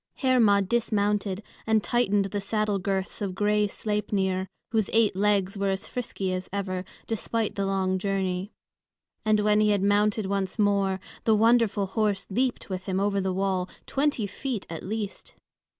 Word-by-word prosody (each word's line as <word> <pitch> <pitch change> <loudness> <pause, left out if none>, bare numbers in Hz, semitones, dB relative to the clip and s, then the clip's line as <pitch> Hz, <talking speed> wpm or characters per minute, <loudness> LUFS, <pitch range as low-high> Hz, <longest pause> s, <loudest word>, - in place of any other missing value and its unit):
Hermod 220 -7 +3
dismounted 210 -3 0 0.2
and 220 -1 +3
tightened 205 -5 +2
the 200 +1 -3
saddle 210 0 0
girths 195 +1 -2
of 195 -3 -2
gray 210 +1 +2
Sleipnir, 195 -3 -1 0.2
whose 220 -4 +1
eight 225 -4 +4
legs 200 -1 +1
were 200 0 +1
as 190 0 -2
frisky 195 -6 -3
as 185 0 -4
ever, 185 -2 -3 0.2
despite 225 0 -1
the 195 -1 -1
long 190 -1 0
journey. 190 0 -1 0.7
And 215 -1 +3
when 210 0 +3
he 215 0 +4
had 200 -2 +2
mounted 205 +1 +2
once 195 0 -2
more, 200 -2 +2 0.3
the 220 - +5
wonderful 225 -2 +3
horse 205 0 0
leaped 250 +5 0
with 185 -1 -5
him 190 -1 -1
over 200 0 +1
the 190 0 0
wall, 190 -1 0 0.2
twenty 280 -5 0
feet 235 +1 -4
at 165 - -5
least! 210 0 -5
200 Hz, 160 wpm, -27 LUFS, 190-215 Hz, 0.7 s, the